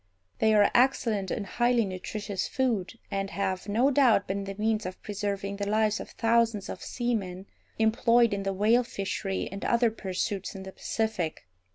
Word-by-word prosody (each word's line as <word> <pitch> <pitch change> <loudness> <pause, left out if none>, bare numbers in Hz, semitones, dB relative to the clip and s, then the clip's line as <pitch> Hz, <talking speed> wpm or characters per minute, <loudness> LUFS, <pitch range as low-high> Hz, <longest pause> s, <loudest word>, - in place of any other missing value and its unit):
They 220 0 +4
are 205 -1 +5
excellent 230 -6 +2
and 205 - -2
highly 240 +1 +2
nutritious 195 +1 -4
food, 225 -6 -1
and 195 0 -2
have, 195 0 -2
no 240 +7 +3
doubt, 250 -7 +4
been 195 +1 -2
the 195 0 -6
means 215 -1 0
of 185 - -7
preserving 200 -1 -3
the 200 0 -2
lives 215 0 +2
of - - -7
thousands 230 -3 +1
of - - -6
seamen 200 -7 -3 0.3
employed 230 +1 +4
in 200 - -1
the 195 0 -1
whale 215 +5 +3
fishery 195 -3 -3
and 195 0 -6
other 235 -1 +3
pursuits 195 -1 -3
in 190 - -7
the 190 - -8
Pacific. 200 - -2
210 Hz, 170 wpm, -28 LUFS, 195-230 Hz, 0.3 s, are